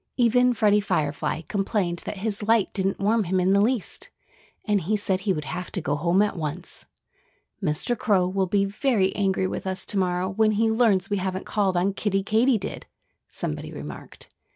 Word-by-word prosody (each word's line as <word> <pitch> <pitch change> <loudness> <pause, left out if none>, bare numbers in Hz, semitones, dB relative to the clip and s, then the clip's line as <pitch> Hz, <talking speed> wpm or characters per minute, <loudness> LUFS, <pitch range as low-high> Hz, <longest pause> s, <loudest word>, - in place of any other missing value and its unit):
Even 245 0 +4
Freddie 210 -2 +3
Firefly 160 -5 -1
complained 195 -2 -1
that 210 - -4
his 205 +1 -2
light 220 0 +2
didn't 195 0 0
warm 215 +2 +2
him 185 +2 0
in 185 +1 +3
the 200 - +4
least. 230 -1 0 0.6
And 210 -3 +2
he 210 +6 0
said 190 -2 0
he 195 +1 -1
would 150 -5 -2
have 180 +6 -5
to - - -1
go 145 -3 -1
home 170 +6 +2
at 210 - -1
once. 160 +1 -4 0.7
"Mr. 180 +8 0
Crow 195 -5 +2
will 190 0 0
be 200 +2 +2
very 200 -2 +1
angry 190 -2 +1
with 185 - -4
us 190 0 -1
to 200 - 0
morrow 180 0 0
when 215 +2 +2
he 220 +1 +2
learns 215 -5 +2
we 205 - +2
haven't 190 0 -3
called 195 -4 0
on 190 +3 +1
Kiddie 195 -1 -1
Katydid," 220 +2 0 0.4
somebody 75 - -5
remarked. 75 -1 -9
195 Hz, 185 wpm, -25 LUFS, 185-215 Hz, 0.7 s, Even